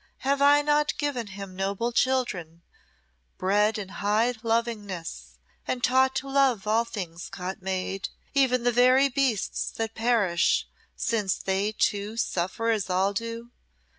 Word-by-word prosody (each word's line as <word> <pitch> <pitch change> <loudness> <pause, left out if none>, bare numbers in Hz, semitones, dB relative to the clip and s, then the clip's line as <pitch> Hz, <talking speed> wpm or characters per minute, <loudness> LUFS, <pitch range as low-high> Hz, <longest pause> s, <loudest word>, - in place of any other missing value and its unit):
Have 280 +1 +1
I 290 +1 +6
not 295 0 +1
given 275 -6 -2
him 195 -1 -8
noble 200 +5 -1
children, 200 -11 -1 0.7
bred 205 +3 +2
in 200 -3 -6
high 210 +5 +1
lovingness, 205 - -3 0.3
and 250 -1 -2
taught 260 +1 +3
to 265 +1 -2
love 270 -7 +2
all 225 +2 +2
things 180 -6 -6
God 185 +1 -6
made, 190 0 -3 0.2
even 255 -3 +3
the 245 - +3
very 255 +3 +5
beasts 255 -5 0
that 225 0 -4
perish, 220 -7 +2 0.3
since 210 -5 0
they, 195 +2 -1
too, 210 +1 -1
suffer 225 +2 -1
as 215 -3 -1
all 190 +2 +1
do? 230 +2 -5
225 Hz, 135 wpm, -26 LUFS, 195-250 Hz, 0.7 s, I